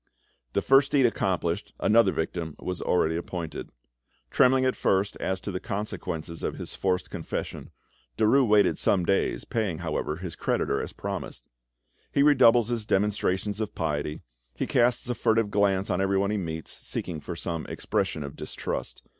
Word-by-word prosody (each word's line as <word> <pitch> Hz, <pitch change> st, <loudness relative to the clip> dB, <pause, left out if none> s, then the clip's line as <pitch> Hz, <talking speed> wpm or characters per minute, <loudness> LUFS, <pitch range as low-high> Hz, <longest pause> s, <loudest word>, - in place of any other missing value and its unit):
This -, -, 0 dB
first 135 Hz, +1 st, +5 dB
deed 135 Hz, -3 st, +5 dB
accomplished, 95 Hz, -4 st, -1 dB
another 110 Hz, -2 st, +4 dB
victim 80 Hz, -2 st, -3 dB
was 90 Hz, -1 st, -4 dB
already 80 Hz, -2 st, +2 dB
appointed. 85 Hz, -1 st, -5 dB, 0.6 s
Trembling 130 Hz, 0 st, +4 dB
at 130 Hz, -, +1 dB
first 95 Hz, +1 st, +1 dB
as 95 Hz, 0 st, -2 dB
to 100 Hz, -, -4 dB
the 90 Hz, -, -3 dB
consequences 90 Hz, -5 st, -4 dB
of -, -, -2 dB
his -, -, -7 dB
forced 90 Hz, -1 st, -1 dB
confession, -, -, -5 dB, 0.5 s
Derues 130 Hz, +4 st, +4 dB
waited 105 Hz, -1 st, +4 dB
some 90 Hz, -3 st, +2 dB
days, 95 Hz, -, +1 dB
paying, 105 Hz, -8 st, -1 dB
however, 80 Hz, -2 st, -2 dB
his 90 Hz, 0 st, -6 dB
creditor -, -, 0 dB
as -, -, -5 dB
promised. -, -, -6 dB, 0.6 s
He 140 Hz, -, +3 dB
redoubles 120 Hz, -5 st, +6 dB
his 115 Hz, -3 st, -2 dB
demonstrations 100 Hz, 0 st, 0 dB
of 105 Hz, -, -4 dB
piety, 75 Hz, -2 st, -2 dB, 0.3 s
he -, -, -1 dB
casts 120 Hz, 0 st, +2 dB
a 125 Hz, -, 0 dB
furtive 115 Hz, -3 st, +1 dB
glance 100 Hz, -1 st, +2 dB
on 90 Hz, +1 st, +1 dB
everyone 100 Hz, +1 st, +1 dB
he 105 Hz, -, 0 dB
meets, 80 Hz, -4 st, -4 dB
seeking 85 Hz, -3 st, -5 dB
for 85 Hz, +4 st, -6 dB
some 85 Hz, -1 st, -4 dB
expression 75 Hz, -, -2 dB
of 70 Hz, 0 st, -7 dB
distrust. -, -, -5 dB
95 Hz, 160 wpm, -27 LUFS, 85-110 Hz, 0.6 s, redoubles